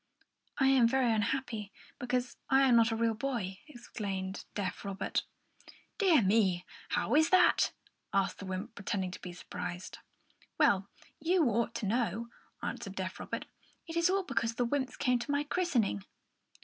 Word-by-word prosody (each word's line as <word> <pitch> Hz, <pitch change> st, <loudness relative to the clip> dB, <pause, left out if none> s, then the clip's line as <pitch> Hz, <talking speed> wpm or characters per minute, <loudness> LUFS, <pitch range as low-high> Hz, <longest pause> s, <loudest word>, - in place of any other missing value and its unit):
"I 270 Hz, -, +3 dB
am 265 Hz, -3 st, +6 dB
very 250 Hz, -1 st, +3 dB
unhappy, 220 Hz, -1 st, -1 dB, 0.3 s
because 250 Hz, 0 st, -1 dB
I 270 Hz, 0 st, +5 dB
am 255 Hz, -3 st, +5 dB
not 230 Hz, -1 st, +5 dB
a -, -, 0 dB
real 230 Hz, 0 st, +2 dB
boy," 220 Hz, -6 st, -3 dB
explained 200 Hz, -8 st, -5 dB
deaf 200 Hz, -2 st, -3 dB
Robert. 195 Hz, -1 st, -2 dB, 0.7 s
"Dear 350 Hz, -, +5 dB
me! 190 Hz, -3 st, +3 dB, 0.2 s
How -, -, 0 dB
is 315 Hz, +2 st, +5 dB
that?" 370 Hz, -1 st, +5 dB, 0.4 s
asked 195 Hz, 0 st, +1 dB
the 195 Hz, -, -7 dB
wymp, 190 Hz, +5 st, -4 dB
pretending 195 Hz, -3 st, -2 dB
to -, -, -9 dB
be 180 Hz, -, -6 dB
surprised. 175 Hz, 0 st, -6 dB, 0.6 s
"Well, 195 Hz, 0 st, +3 dB, 0.3 s
you 345 Hz, -1 st, +3 dB
ought 230 Hz, +1 st, 0 dB
to 235 Hz, -, -2 dB
know," 230 Hz, +1 st, 0 dB, 0.3 s
answered -, -, -4 dB
deaf -, -, -4 dB
Robert. -, -, -4 dB, 0.4 s
"It 330 Hz, -, -7 dB
is 335 Hz, +1 st, +3 dB
all 390 Hz, +1 st, +2 dB
because 235 Hz, -7 st, -1 dB
the 245 Hz, -, +1 dB
wymps 265 Hz, +1 st, -1 dB
came 250 Hz, -3 st, +2 dB
to 240 Hz, -, -6 dB
my 285 Hz, 0 st, +1 dB
christening." 270 Hz, -, 0 dB
235 Hz, 160 wpm, -32 LUFS, 200-270 Hz, 0.7 s, am